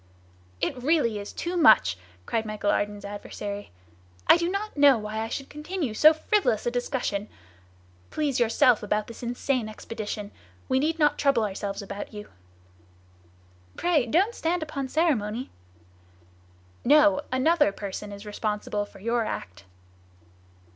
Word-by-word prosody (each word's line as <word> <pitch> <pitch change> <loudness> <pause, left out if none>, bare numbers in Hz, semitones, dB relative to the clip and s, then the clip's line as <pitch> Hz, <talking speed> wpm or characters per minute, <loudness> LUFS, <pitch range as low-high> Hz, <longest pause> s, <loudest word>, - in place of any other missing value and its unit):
"It 255 - -1
really 255 -7 +2
is 200 - -7
too 345 +1 -4
much!" 310 - +6 0.3
cried 225 - -1
Michel 215 -1 -1
Ardan's 205 0 -2
adversary. 205 0 -6 0.6
"I - - +8
do 340 0 0
not 405 +3 -3
know 285 -3 +6
why 215 0 -4
I 225 - -2
should 270 +4 -5
continue 300 - -4
so 305 +8 +7
frivolous 315 - +1
a 240 - +1
discussion! 245 -4 -2 0.8
Please 290 -5 -1
yourself 240 0 +4
about 210 0 -1
this 230 - -11
insane 245 -1 -1
expedition! 215 -1 -6 0.4
We 260 - +2
need 320 +4 0
not 295 -2 +2
trouble 275 -6 +3
ourselves 200 0 -4
about 200 +2 -7
you!" 210 0 -8 1.5
"Pray 315 -8 +2
don't 380 - +2
stand 340 -4 -1
upon 280 -3 -4
ceremony!" 255 -7 0 1.3
"No! 300 +1 +5
another 290 0 +3
person 200 +1 -6
is 200 +1 -9
responsible 210 0 -2
for - - -16
your 230 +3 0
act." 95 - -6
240 Hz, 135 wpm, -26 LUFS, 210-300 Hz, 1.5 s, I